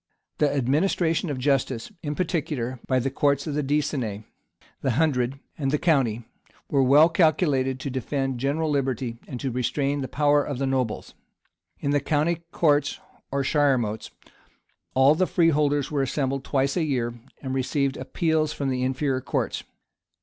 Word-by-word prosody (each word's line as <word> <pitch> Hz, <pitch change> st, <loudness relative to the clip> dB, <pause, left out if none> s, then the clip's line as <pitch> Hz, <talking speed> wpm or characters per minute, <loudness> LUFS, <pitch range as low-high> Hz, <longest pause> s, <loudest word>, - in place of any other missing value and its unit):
The 150 Hz, -1 st, +3 dB
administration 160 Hz, +5 st, +1 dB
of 140 Hz, -, -2 dB
justice, 130 Hz, -3 st, 0 dB
in 150 Hz, -2 st, -3 dB
particular, 145 Hz, -8 st, -2 dB
by 130 Hz, -, +2 dB
the 130 Hz, +1 st, 0 dB
courts 140 Hz, 0 st, +1 dB
of 155 Hz, -, -3 dB
the 150 Hz, -, 0 dB
decennary, 135 Hz, -7 st, -1 dB, 0.6 s
the 130 Hz, -, +1 dB
hundred, 135 Hz, -4 st, +1 dB, 0.2 s
and 135 Hz, -2 st, 0 dB
the 150 Hz, -, +2 dB
county, 135 Hz, -9 st, +1 dB, 0.5 s
was 135 Hz, -3 st, +3 dB
well 145 Hz, +4 st, +7 dB
calculated 150 Hz, -6 st, +2 dB
to 135 Hz, 0 st, -4 dB
defend 135 Hz, 0 st, -2 dB
general 150 Hz, +4 st, 0 dB
liberty, 130 Hz, -4 st, -1 dB
and 125 Hz, -, -6 dB
to 135 Hz, -, -2 dB
restrain 135 Hz, +4 st, -1 dB
the 130 Hz, -, -3 dB
power 145 Hz, +1 st, +3 dB
of 140 Hz, -2 st, -4 dB
the 135 Hz, -, -1 dB
nobles. 130 Hz, -4 st, -2 dB, 0.7 s
In 140 Hz, -, 0 dB
the 145 Hz, -, +3 dB
county 155 Hz, +4 st, 0 dB
courts, 150 Hz, -3 st, +2 dB, 0.3 s
or 140 Hz, 0 st, 0 dB
shiremotes, 130 Hz, -7 st, +1 dB, 0.9 s
all 135 Hz, +2 st, +6 dB
the 185 Hz, +4 st, +1 dB
freeholders 150 Hz, -5 st, +2 dB
were 145 Hz, -2 st, +1 dB
assembled 135 Hz, 0 st, -1 dB
twice 135 Hz, 0 st, 0 dB
a 175 Hz, -, +1 dB
year, 125 Hz, -6 st, -1 dB, 0.3 s
and 130 Hz, -1 st, -3 dB
received 135 Hz, +1 st, 0 dB
appeals 160 Hz, -2 st, 0 dB
from 140 Hz, -2 st, -2 dB
the 130 Hz, -1 st, -1 dB
inferior 130 Hz, +1 st, 0 dB
courts. -, -, -2 dB
140 Hz, 155 wpm, -25 LUFS, 130-150 Hz, 0.9 s, well